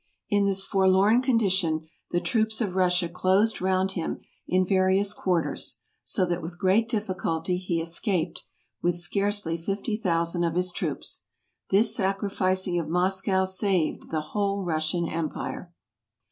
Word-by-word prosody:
In 205 -1 +3
this 195 -1 0
forlorn 195 +4 +4
condition 190 - +1 0.2
the 175 - +1
troops 220 +2 0
of 205 -6 -1
Russia 180 -1 +2
closed 190 +5 +2
round 190 0 +1
him 170 -4 -3 0.3
in 185 +1 +2
various 190 +1 +2
quarters, 180 -5 -1 0.3
so 185 - 0
that 175 0 -2
with 170 +2 -7
great 200 +5 +2
difficulty 185 -5 -1
he 180 -2 -1
escaped, 170 0 -1 0.4
with 175 0 +1
scarcely 195 0 -1
fifty 200 +6 -2
thousand 170 -4 0
of 165 -1 0
his 180 0 +1
troops. - - -4 0.4
This 210 +3 +4
sa¬ 195 0 +1
crificing 185 -3 0
of 160 -2 -4
Moscow 190 +2 +1
saved 190 -3 0
the 160 -1 -1
whole 200 +5 -1
Russian 165 +1 0
empire. 165 +2 -4
185 Hz, 140 wpm, -26 LUFS, 175-200 Hz, 0.4 s, forlorn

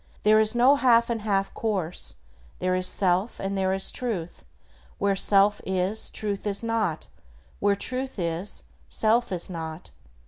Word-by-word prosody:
There 215 +1 +5
is 220 +1 +3
no 260 +4 +5
half 235 -3 +4
and 225 -2 -2
half 195 -2 -1
course; 190 -7 -2 0.4
"There 185 0 0
is 185 0 +2
self 185 +4 +1
and 195 +1 -3
there 190 -1 0
is 190 0 0
Truth; 180 - -4 0.5
where 200 0 +1
self 200 +1 +4
is, 190 +3 -1
Truth 205 -1 -3
is 200 +2 -1
not, 220 -8 -1 0.5
where 200 0 +2
Truth 255 +5 -4
is, 170 - -2 0.3
self 230 +1 +1
is 180 -2 -2
not." 165 -2 -7
200 Hz, 150 wpm, -25 LUFS, 185-220 Hz, 0.5 s, There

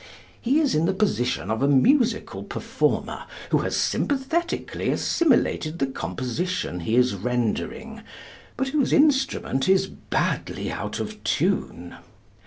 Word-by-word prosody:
He 270 +6 +2
is 295 -4 +2
in 155 +2 +2
the 190 +2 +1
position 160 - 0
of 110 - -1
a 140 - +3
musical 225 - +2
performer - - -2 0.3
who - - +4
has - - -1
sympathetically 290 +5 -1
assimilated 240 - +1
the 135 - +1
composition 130 - -3
he 100 +7 -1
is 125 -2 +4
rendering, 115 +3 -2 0.6
but 265 +1 -1
whose 285 -1 +1
instrument 270 - +2
is 190 0 +4
badly - - -2
out - - -4
of - - -6
tune. 85 0 -1
185 Hz, 125 wpm, -24 LUFS, -, 0.6 s, who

